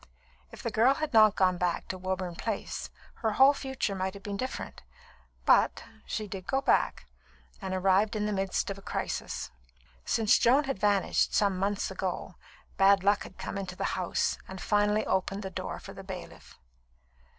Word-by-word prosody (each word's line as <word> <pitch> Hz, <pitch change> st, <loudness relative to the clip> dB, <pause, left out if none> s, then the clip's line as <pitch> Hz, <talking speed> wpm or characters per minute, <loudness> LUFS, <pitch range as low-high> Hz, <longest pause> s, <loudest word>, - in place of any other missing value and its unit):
If -, -, -11 dB
the 230 Hz, -, -2 dB
girl 240 Hz, +6 st, +4 dB
had 310 Hz, -2 st, -3 dB
not 215 Hz, -2 st, +7 dB
gone 185 Hz, -2 st, +2 dB
back 175 Hz, -1 st, -1 dB
to 185 Hz, -, -3 dB
Woburn 185 Hz, -1 st, -3 dB
Place, 215 Hz, +3 st, -4 dB, 0.3 s
her 220 Hz, -2 st, -1 dB
whole 270 Hz, +5 st, +7 dB
future 265 Hz, -7 st, -3 dB
might 190 Hz, 0 st, -3 dB
have 200 Hz, -, -11 dB
been 205 Hz, -1 st, -4 dB
different. 255 Hz, +6 st, -5 dB, 0.6 s
But -, -, +4 dB, 0.2 s
she 215 Hz, -1 st, -3 dB
did 190 Hz, -2 st, -7 dB
go 270 Hz, -, +1 dB
back, 270 Hz, -, +1 dB, 0.6 s
and 190 Hz, -1 st, -4 dB
arrived 195 Hz, +3 st, +2 dB
in 210 Hz, -1 st, 0 dB
the 210 Hz, -, -1 dB
midst 195 Hz, 0 st, -1 dB
of 195 Hz, -, -6 dB
a -, -, -14 dB
crisis. -, -, -4 dB, 0.5 s
Since 220 Hz, -, +3 dB
Joan 265 Hz, +5 st, +5 dB
had 270 Hz, -8 st, -3 dB
vanished, 200 Hz, -2 st, +2 dB
some 200 Hz, -2 st, +3 dB
months 200 Hz, +2 st, -1 dB
ago, -, -, -4 dB, 0.4 s
bad 195 Hz, 0 st, +5 dB
luck 205 Hz, +1 st, +3 dB
had -, -, -10 dB
come 200 Hz, -, -4 dB
into 185 Hz, -2 st, -5 dB
the -, -, -4 dB
house 180 Hz, -2 st, -1 dB
and 190 Hz, 0 st, -8 dB
finally 210 Hz, +2 st, +2 dB
opened 195 Hz, +2 st, -1 dB
the 190 Hz, -, -5 dB
door 185 Hz, +1 st, -5 dB
for 195 Hz, -, -10 dB
the 195 Hz, -, -10 dB
bailiff. 190 Hz, -2 st, -9 dB
200 Hz, 180 wpm, -29 LUFS, 190-215 Hz, 0.6 s, not